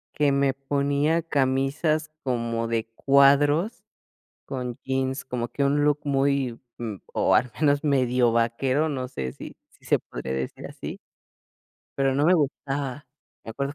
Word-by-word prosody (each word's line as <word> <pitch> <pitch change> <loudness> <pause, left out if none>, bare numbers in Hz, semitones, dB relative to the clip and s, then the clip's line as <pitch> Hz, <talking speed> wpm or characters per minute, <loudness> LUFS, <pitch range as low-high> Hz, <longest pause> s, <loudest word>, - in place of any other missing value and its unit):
que 145 -2 +3
me 140 -1 +2
ponía 140 +4 0
camisas 145 +2 0
como 115 -3 -1
de 115 -1 -1
cuadros, 145 - +4 0.6
con 125 -2 -5
jeans. 130 0 -2
Como 125 -2 -3
que 140 - -1
un 145 +1 +2
look 150 0 +2
muy, 135 -3 +1 0.2
mm, 110 -4 -4 0.2
o, - - +3
al 125 - +2
menos 145 -1 +3
medio 125 -4 +2
vaquero, 130 +6 +1
no 130 -3 -3
sé 65 - -4
si - - -10
si - - -25
se - - +3
podría 65 - -6
decir 65 0 -4
así. - - -7 1.0
Pero 135 -1 +2
no 145 +2 +2
me 180 +3 +5
gustaba, 140 -3 -2 0.4
me - - -7
acuerdo 140 +5 -3
135 Hz, 150 wpm, -25 LUFS, 125-145 Hz, 1.0 s, me